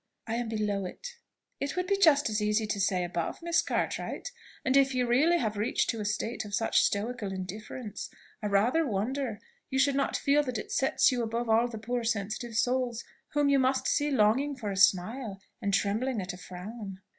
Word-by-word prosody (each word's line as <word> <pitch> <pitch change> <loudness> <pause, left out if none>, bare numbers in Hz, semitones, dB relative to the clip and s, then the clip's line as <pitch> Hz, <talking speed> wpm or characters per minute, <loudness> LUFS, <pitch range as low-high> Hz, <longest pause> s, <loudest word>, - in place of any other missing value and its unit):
"I 225 - -3
am 240 -2 -2
below 210 -3 -1
it." - - -7 0.5
"It 280 - -3
would 365 0 0
be 395 - +2
just 315 -7 +5
as 215 -1 -1
easy 210 +1 +1
to 210 -1 -2
say, 185 -2 +1
above, 175 - -3
Miss 340 0 +3
Cartwright; - - -2 0.3
and 260 - +2
if 270 -1 +4
you 250 -1 +2
really 290 +9 +4
have 215 -7 -1
reached 210 +3 +1
to 225 -2 -5
a - - -4
state 215 +3 -2
of 205 -1 -3
such 225 - +3
stoical 210 0 -1
indifference, 205 +3 -6 0.3
I 210 - -1
rather 220 +11 +3
wonder 235 0 -2 0.3
you 265 - -1
should 275 +1 +4
not 275 0 0
feel 285 +1 +3
that 255 -5 -3
it - - -6
sets 270 - +3
you 250 -1 0
above 230 +1 -2
all 225 +2 +4
the 235 -2 -7
poor 240 +3 -2
sensitive 225 +1 -2
souls 245 0 0 0.3
whom 290 -1 +3
you 280 -1 +4
must 260 0 +1
see 290 0 +2
longing 265 +3 +2
for 220 -6 -4
a - - -3
smile, 200 +3 +2 0.2
and 200 - 0
trembling 215 +5 0
at 185 -1 -4
a - - -9
frown." 190 +2 -8
230 Hz, 205 wpm, -29 LUFS, 205-265 Hz, 0.5 s, just